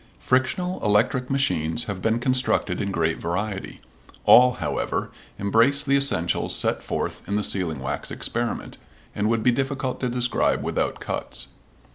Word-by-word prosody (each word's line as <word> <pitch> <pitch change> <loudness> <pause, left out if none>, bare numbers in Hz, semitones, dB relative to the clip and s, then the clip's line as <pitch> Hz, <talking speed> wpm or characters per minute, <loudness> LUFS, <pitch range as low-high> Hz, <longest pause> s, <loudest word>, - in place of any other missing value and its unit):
Frictional 180 +8 0
electric 115 +5 +2
machines 90 - +1
have 100 -3 -5
been 110 +3 +1
constructed 125 -7 +1
in 100 - -2
great 80 -3 0
variety. 95 +3 -3 0.5
All, 125 0 +7
however, - - -3 0.3
embrace 115 +8 +3
the 140 -1 +2
essentials 140 -12 +1
set - - 0
forth - - -3
in 100 - -1
the 105 - 0
sealing 90 -7 0
wax 65 +2 -4
experiment, 120 0 -3 0.3
and 105 +1 0
would 115 -1 +1
be 125 - +5
difficult 135 0 -2
to 125 - -1
describe 125 0 0
without - - -1
cuts. - - -5
115 Hz, 145 wpm, -24 LUFS, 95-130 Hz, 0.5 s, All